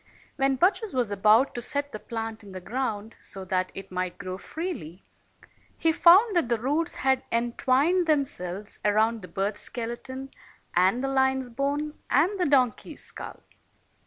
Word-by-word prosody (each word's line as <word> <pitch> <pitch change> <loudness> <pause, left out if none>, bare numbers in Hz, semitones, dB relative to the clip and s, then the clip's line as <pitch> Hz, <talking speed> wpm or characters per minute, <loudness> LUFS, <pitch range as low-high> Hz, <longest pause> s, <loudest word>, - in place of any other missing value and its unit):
When 270 -1 +2
Bacchus 380 - +1
was 240 -5 0
about 215 +6 +4
to 240 - -4
set 285 +4 -1
the 215 - -6
plant 225 -1 -5
in 200 -2 -12
the 185 - -5
ground 220 +1 -3
so 195 -1 -2
that 185 0 -1
it 195 0 -9
might 185 -1 -3
grow 185 0 -6
freely, 245 - -6 0.7
he 325 - +3
found 375 +6 +6
that 330 -8 +2
the 235 - +2
roots 300 +8 0
had 265 -1 +2
entwined 260 +9 +2
themselves 210 - -1
around 220 +2 +2
the 180 - -9
bird's 195 +4 -2
skeleton 260 +3 -5 0.4
and 190 +8 +3
the - - 0
lion's 265 -1 +1
bone 285 +4 -2
and 355 +9 +2
the 360 - +2
donkey's 255 -5 +1
skull. - - -8
245 Hz, 160 wpm, -27 LUFS, 205-285 Hz, 0.7 s, found